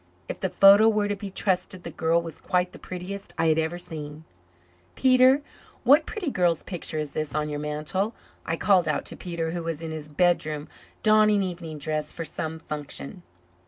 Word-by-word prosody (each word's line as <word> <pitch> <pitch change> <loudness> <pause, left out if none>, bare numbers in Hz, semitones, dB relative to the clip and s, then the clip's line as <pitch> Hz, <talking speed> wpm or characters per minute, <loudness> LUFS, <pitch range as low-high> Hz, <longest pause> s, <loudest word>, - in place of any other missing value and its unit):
If - - -5
the 190 - -1
photo 200 +4 +7
were 210 -2 +1
to 205 - -1
be 200 0 -7
trusted 185 -1 -1
the 170 - -6
girl 165 +2 +1
was 165 -1 -8
quite 180 -1 0
the - - -12
prettiest 185 +2 -7
I 165 - +1
had 160 0 +3
ever 160 +2 -1
seen. 155 -3 -6 0.7
"Peter, 260 +2 +5 0.4
what 295 +4 +5
pretty 380 -10 -3
girl's 175 -5 +1
picture 175 -4 -4
is 150 -2 -2
this 155 0 -4
on 150 0 -1
your 145 0 -3
mantel?" 150 +9 -2 0.3
I 165 - -2
called 185 -1 +3
out 150 - -1
to - - -7
Peter, 170 -2 -4
who 175 0 -3
was 165 -1 -4
in 160 - -4
his 155 -1 -7
bedroom, 155 -2 +1 0.3
donning 215 -2 +5
evening 170 -4 -5
dress 150 0 -2
for 165 - -6
some 160 +1 -4
function. 145 - -6
170 Hz, 190 wpm, -26 LUFS, 155-195 Hz, 0.7 s, photo